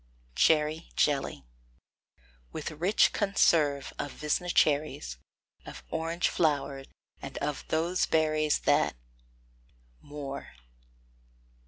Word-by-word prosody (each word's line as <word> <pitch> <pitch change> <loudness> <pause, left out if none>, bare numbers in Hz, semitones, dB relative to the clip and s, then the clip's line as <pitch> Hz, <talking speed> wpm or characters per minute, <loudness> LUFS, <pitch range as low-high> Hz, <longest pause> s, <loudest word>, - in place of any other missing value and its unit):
CHERRY 155 - +2
JELLY. 135 - 0 1.1
With - - -5
rich 175 +7 +2
conserve 155 - +2
of 145 - -3
Visna 155 +4 -2
cherries, 145 - +1 0.5
Of - - -10
orange 165 +2 0
flower, 140 -4 0 0.4
and 135 - -7
of 145 0 -3
those 170 +3 +1
berries 155 -1 +2
That. - - +2 1.1
MOORE. 145 -1 -7
150 Hz, 85 wpm, -29 LUFS, 140-160 Hz, 1.1 s, CHERRY